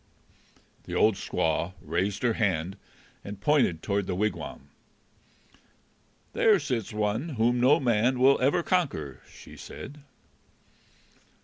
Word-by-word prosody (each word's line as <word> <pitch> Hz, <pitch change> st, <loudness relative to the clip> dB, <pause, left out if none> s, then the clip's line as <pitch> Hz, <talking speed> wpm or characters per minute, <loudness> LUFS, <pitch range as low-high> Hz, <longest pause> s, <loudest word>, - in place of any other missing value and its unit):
The -, -, -5 dB
old 110 Hz, -, +4 dB
squaw 85 Hz, -1 st, -1 dB
raised 90 Hz, +7 st, -2 dB
her 120 Hz, -2 st, +3 dB
hand 95 Hz, -4 st, -1 dB, 0.5 s
and 100 Hz, 0 st, -8 dB
pointed 105 Hz, -, +2 dB
toward 100 Hz, -1 st, -1 dB
the 90 Hz, -, -2 dB
wigwam. 105 Hz, +3 st, -3 dB, 1.6 s
"There 460 Hz, -4 st, +4 dB
sits 115 Hz, -6 st, -3 dB
one 105 Hz, +8 st, -1 dB
whom 120 Hz, +2 st, +2 dB
no 130 Hz, +4 st, +5 dB
man 120 Hz, 0 st, +2 dB
will 130 Hz, +2 st, +4 dB
ever 140 Hz, +6 st, +2 dB
conquer!" 135 Hz, -, -1 dB
she -, -, -13 dB
said. 145 Hz, +2 st, -10 dB
110 Hz, 115 wpm, -27 LUFS, 95-130 Hz, 1.6 s, no